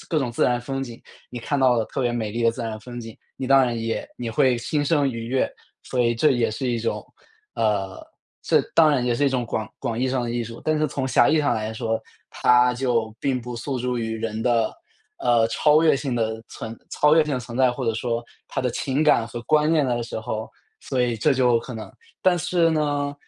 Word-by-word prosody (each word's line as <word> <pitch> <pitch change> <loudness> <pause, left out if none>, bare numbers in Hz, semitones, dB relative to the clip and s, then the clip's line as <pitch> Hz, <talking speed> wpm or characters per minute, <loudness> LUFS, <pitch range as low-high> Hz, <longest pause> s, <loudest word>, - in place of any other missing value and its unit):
各 160 - +1
种 125 -4 -1
自 - - +1
然 120 0 +2
风 135 +2 -4
景， 120 -3 -8 0.3
你 120 - -6
看 140 +4 -2
到 130 -2 +4
的 115 - +1
特 - - -4
别 120 -2 +1
美 110 -3 -2
丽 115 +2 -3
的 115 - +4
自 115 +1 -6
然 110 -1 -4
风 120 +1 -8
景， 115 -1 -9 0.2
你 130 - -4
当 135 0 +6
然 120 -2 -2
也 115 0 -3
也 120 -2 -3
会 125 +2 +3
心 145 +4 -1
生 145 -2 +2
愉 115 -2 -5
悦， 130 +2 0 0.3
所 125 - -2
以 120 -1 +2
这 145 +6 +3
也 120 -4 +1
是 125 +4 -3
一 120 - 0
种 115 - -3 0.5
呃， 100 -4 -1 0.4
这 - - +3
当 160 -1 +6
然 130 -4 +1
也 120 - +1
是 145 - +1
一 - - +4
种 130 -2 -1
广 110 -1 -3
广 115 0 -3
义 130 +1 +1
上 130 -1 0
的 120 - -3
艺 120 0 -1
术。 115 +1 -9
但 155 -1 +1
是 155 - +2
从 135 -1 -3
狭 - - +4
义 160 - +3
上 145 -1 +2
来 110 0 -3
说， 110 0 -2 0.3
它 125 0 +4
就 120 -4 0
并 130 -3 0
不 120 0 -7
诉 130 +3 -3
诸 125 -1 -1
于 110 -1 -2
人 110 0 -3
的， 115 -2 +2 0.5
呃， 120 -2 +3
超 150 +6 +4
越 155 -4 +4
性 135 -3 -3
的 110 -1 -1
存 115 0 -7
超 150 +1 +4
越 160 - +5
性 150 -3 -2
的 125 - -2
存 120 +2 -7
在， 130 -2 +4
或 130 0 -4
者 115 - +1
说 115 +1 -2 0.2
它 - - -3
的 125 -1 0
情 135 +4 -1
感 120 -7 +4
和 120 +1 -7
观 155 +3 +3
念 155 -3 +3
的 120 -2 0
时 115 - -5
候， 110 0 -4 0.3
所 125 -2 -1
以 120 -2 0
这 140 +7 +2
就 125 -2 +3
可 120 +1 -8
能 110 - -7 0.3
但 180 -1 +4
是 170 0 +2
呢， 145 -2 0
125 Hz, 265 characters per minute, -23 LUFS, 115-135 Hz, 0.5 s, 当